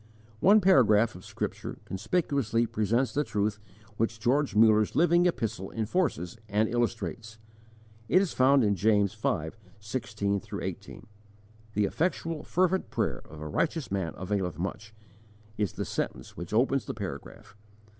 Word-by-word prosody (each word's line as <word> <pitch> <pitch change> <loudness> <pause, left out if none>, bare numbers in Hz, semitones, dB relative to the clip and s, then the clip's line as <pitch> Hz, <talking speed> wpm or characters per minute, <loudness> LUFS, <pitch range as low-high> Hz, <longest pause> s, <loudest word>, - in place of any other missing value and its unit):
_ - - -25 0.4
One 210 - +6
paragraph 115 - +5
of 90 - -12
Scripture - - -5
conspicuously 120 - 0
presents 115 +4 0
the 145 - +1
truth 105 -3 -1 0.4
which 115 0 -1
George 130 0 +1
Muller's 110 -1 +5
living 175 +1 +4
epistle 110 - -2
enforces 115 - -1
and 105 +2 +2
illustrates; 115 -1 -2 0.7
it 185 - +6
is 190 -3 0
found 135 +1 +4
in 105 -1 +3
James 100 +1 +2
v. 80 -7 -1 0.3
16 105 -2 -2 0.2
18: - - -7 0.7
"The 105 0 +3
effectual 165 - -1
fervent 185 +1 +1
prayer - - -1
of 80 -1 -10
a 75 - -5
righteous 155 - -1
man 95 -4 -2
availeth 95 -1 -2
much," 105 +5 -5 0.6
is 105 -4 -1
the - - -4
sentence 65 - -4
which 85 0 -7
opens 130 +4 +2
the - - -5
paragraph. 105 0 -8
110 Hz, 140 wpm, -28 LUFS, 100-135 Hz, 0.7 s, One